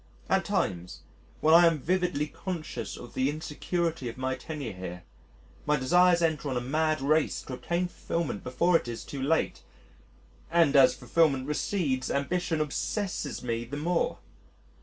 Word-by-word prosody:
At - - +3
times, 90 -2 -2 0.4
when 155 +1 +5
I 170 +1 +8
am 165 -2 +2
vividly 175 0 0
conscious 170 +1 -5
of 120 - -11
the 130 +1 +1
insecurity 155 -1 -2
of 115 - -9
my 130 0 -1
tenure 140 -2 -6
here, 90 -1 -7 0.6
my 150 - +4
desires 175 +6 +4
enter 155 -3 0
on 130 - -1
a - - +2
mad 155 +4 0
race 155 +2 +1
to 130 - -7
obtain 175 +7 -1
fulfilment 165 - -3
before 170 +8 +2
it 165 - +2
is 115 -1 -5
too 140 - -6
late... 155 +4 0 0.9
and 165 -3 +3
as 135 -2 +7
fulfilment 135 +1 +2
recedes 145 -3 -1
ambition 165 +3 0
obsesses 155 0 -2
me 115 -1 -2
the 130 +5 -6
more. 170 +3 0
150 Hz, 155 wpm, -28 LUFS, 130-170 Hz, 0.9 s, I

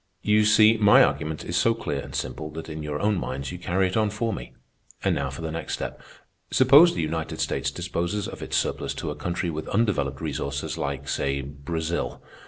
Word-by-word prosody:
You 105 0 +4
see, 110 +1 +6
my 105 -1 +7
argument 80 0 -1
is 85 - -3
so 115 +4 +3
clear 75 -11 -3
and - - -8
simple 75 0 -4
that 80 +1 -7
in 80 0 -5
your 75 -1 -3
own 105 -2 +1
minds 70 0 -4
you 90 - -7
carry 95 +2 +1
it 90 - -2
on 110 -1 +2
for 110 +2 -2
me. - - -8 0.5
And 95 - +2
now 70 -3 -1
for 70 +5 -7
the 80 - -3
next 85 +1 -3
step. - - -6 0.5
Suppose 140 +7 +7
the - - -1
United 80 +1 -3
States - - 0
disposes 90 +4 -2
of - - -8
its - - -1
surplus - - -1
to - - -3
a - - -5
country 85 +3 -2
with 80 0 -5
undeveloped 80 - 0
resources 70 -2 -3
like, 70 -4 -4
say, 70 0 -1
Brazil. 80 +4 -3
80 Hz, 205 wpm, -25 LUFS, 75-105 Hz, 0.5 s, my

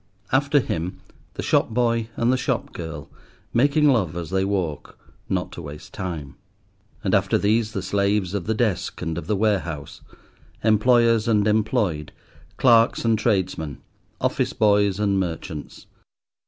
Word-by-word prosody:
After 140 +2 +3
him, 90 -7 -3 0.4
the - - -4
shop - - +2
boy 115 -1 0
and 120 +2 +2
the - - +3
shop 130 - -2
girl, 80 -4 -7 0.5
making 145 +5 +3
love 95 - +2
as 85 -3 -5
they 95 0 +1
walk, 95 -7 -3 0.3
not - - -1
to - - -8
waste 75 0 -10
time. 80 -7 -5 0.7
And - - 0
after - - +3
these 110 +1 +1
the - - -3
slaves 100 -2 0
of 100 -3 -3
the 110 - +1
desk 110 -6 -1
and 80 0 -2
of 85 -1 -6
the 105 - +1
warehouse, 95 -8 -1 0.6
employers 115 +1 +4
and 105 -2 +3
employed, 105 - 0 0.5
clerks 115 -2 +4
and 115 -2 +3
tradesmen, 95 - -1 0.4
office - - 0
boys 100 -2 +3
and 100 -2 +1
merchants. 85 -3 -5
105 Hz, 145 wpm, -23 LUFS, 85-115 Hz, 0.7 s, employers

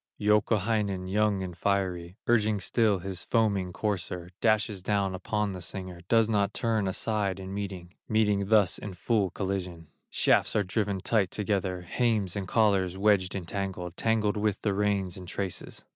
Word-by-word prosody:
Youkahainen, 105 -2 +1
young 100 0 +1
and 90 -2 -6
fiery, 90 -2 -1
Urging 110 -3 +2
still 105 +2 +2
his 95 0 -5
foaming 100 -5 +1
courser, 90 -3 -3
Dashes 105 -2 +2
down 100 0 0
upon 105 +2 -1
the 90 -1 -6
singer, 90 0 -6
Does 115 -2 +5
not 105 -2 +1
turn 110 -4 +1
aside 100 0 -1
in 95 0 -7
meeting, 95 -3 -5 0.2
Meeting 105 -2 +2
thus 105 -4 +4
in 100 -3 -7
full 105 0 +1
collision; 90 -4 -4 0.2
Shafts - - +2
are 105 - +3
driven 100 0 -1
tight 100 -2 +2
together, 95 -3 -1
Hames 105 0 0
and 100 -2 -3
collars 95 -5 +2
wedged 100 -2 +2
and 90 -3 -5
tangled, 95 -2 -4
Tangled 110 -1 +1
are 105 -1 +3
the 105 - +1
reins 100 -2 0
and 90 -1 -9
traces. 95 0 -5
100 Hz, 160 wpm, -28 LUFS, 95-105 Hz, 0.2 s, Does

